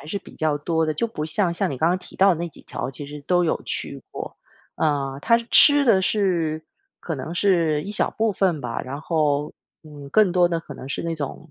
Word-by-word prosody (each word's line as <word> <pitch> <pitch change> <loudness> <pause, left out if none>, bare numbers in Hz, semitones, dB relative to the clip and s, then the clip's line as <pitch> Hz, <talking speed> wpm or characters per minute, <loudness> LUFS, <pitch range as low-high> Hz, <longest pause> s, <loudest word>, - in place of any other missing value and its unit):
还 140 - -12
是 180 +6 -3
比 - - -15
较 155 -2 0
多 160 +2 0
的， 155 - 0
就 230 - 0
不 185 -9 -5
像 170 +3 +1
像 - - -1
你 135 - -5
刚 160 - +3
刚 180 +2 +1
提 185 - -12
到 195 +1 +5
的 - - -7
那 170 - -2
几 160 - -16
条， - - -5
其 140 +2 -6
实 145 +1 -8
都 180 -1 +3
有 160 - 0
去 - - -5
过。 - - -7 0.4
啊， 140 -3 -1
它 230 +9 +4
吃 290 -1 +7
的 195 -7 +4
是， 170 -6 0 0.4
可 165 - -4
能 145 +4 -6
是 170 -6 +2
一 200 - -6
小 - - 0
部 220 -1 0
分 185 -6 +1
吧， 120 -3 -3
然 135 +2 -6
后， 150 -3 0 0.3
嗯， 145 -3 -11
更 205 +1 +4
多 175 -1 +4
的 170 -1 -1
可 165 - -10
能 130 - -9
是 140 - -3
那 165 0 -2
种， 155 +1 -6
160 Hz, 255 characters per minute, -23 LUFS, 150-185 Hz, 0.4 s, 吃